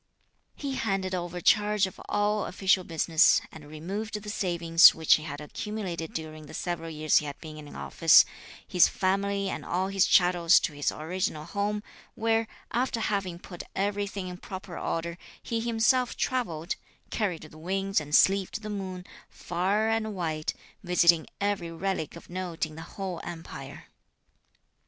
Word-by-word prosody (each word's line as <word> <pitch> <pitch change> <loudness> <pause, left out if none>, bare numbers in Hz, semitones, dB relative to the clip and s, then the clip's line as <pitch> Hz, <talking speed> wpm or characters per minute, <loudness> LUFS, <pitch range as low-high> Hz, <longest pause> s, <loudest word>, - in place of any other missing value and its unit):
He 280 -2 -4
handed 195 -6 -1
over 175 -1 -3
charge 210 +1 +4
of 190 - -9
all 205 0 +1
official 190 0 +2
business 165 -1 +4
and 150 -2 -12
removed 200 +8 -4
the 210 0 -6
savings 170 -4 +5
which 160 -1 +4
he 155 - +2
had 145 -2 -6
accumulated 175 +1 -5
during 155 -1 -6
the - - -9
several 170 -2 -3
years 155 -1 +2
he 150 - -6
had 140 - -7
been 155 -2 -9
in 150 -1 -11
office, 165 -2 +6 0.4
his 180 -2 +5
family 200 +1 0
and - - -4
all 185 +2 -1
his 195 -1 +3
chattels 175 0 +5
to 155 - -2
his 145 0 0
original 160 -1 -3
home; 205 +3 -2 0.3
where, 225 0 +1 0.2
after 245 -1 0
having 195 -5 -1
put 175 0 -9
everything 200 -1 -2
in 180 0 -6
proper 190 -1 -8
order, 170 +1 -3 0.2
he 230 - -2
himself 240 +2 +2
travelled 175 -10 -1 0.3
(carried 195 -7 -1
the 155 0 -13
winds 195 +1 0
and 150 0 -1
sleeved 195 +2 +3
the 215 - -4
moon) 185 -3 -5 0.2
far 190 +5 0
and 220 -1 0
wide, 160 -4 -2 0.3
visiting 175 -2 +4
every 200 -4 -1
relic 170 -2 -3
of 170 - -12
note 175 -2 -3
in 155 - -11
the 160 - -8
whole 185 0 -5
Empire. 165 -5 -8
185 Hz, 155 wpm, -28 LUFS, 165-205 Hz, 0.4 s, office